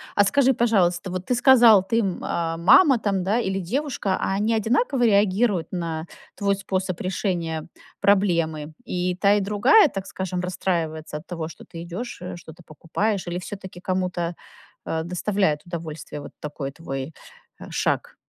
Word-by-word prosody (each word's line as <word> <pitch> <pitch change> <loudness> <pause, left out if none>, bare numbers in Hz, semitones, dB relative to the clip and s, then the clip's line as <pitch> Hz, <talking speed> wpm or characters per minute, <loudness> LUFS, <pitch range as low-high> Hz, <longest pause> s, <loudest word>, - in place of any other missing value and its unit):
А 205 - +6
скажи, 265 +5 +3
пожалуйста, 190 -6 +1
вот 185 0 -4
ты 250 - 0
сказал 240 -5 +7
ты, 230 +4 0
м, 195 -5 -1
а, 165 -1 -2
мама 265 - +6
там, 195 -3 0
да, 205 +6 +1
или 195 -4 -1
девушка, 220 - -1
а - - -1
они 215 +3 +1
одинаково 245 - +1
реагируют 200 -2 +2
на 165 -3 -3 0.3
твой 200 -1 +1
способ 190 -2 -3
решения 175 -4 -2 0.3
проблемы? 170 -6 +1
И 180 0 -1
та 200 0 +5
и - - +2
другая, 210 - +5
так 195 -5 -5
скажем, 185 -1 -4
расстраивается 165 -4 -2
от 150 - -12
того, 165 -2 -4
что - - -13
ты 165 0 -9
идешь, 220 +7 -6
э, 180 - -6
что-то 165 0 -13
покупаешь, 180 +6 -2
или 175 0 -3
всё-таки 190 -1 -8
кому-то, 180 -2 -2 0.5
э, 160 0 -2
доставляет 180 -2 0
удовольствие 160 -3 -7
вот - - -10
такой 145 -2 -5
твой, 135 -1 -6 0.5
э, - - -7
шаг? - - -1
185 Hz, 160 wpm, -24 LUFS, 170-205 Hz, 0.5 s, сказал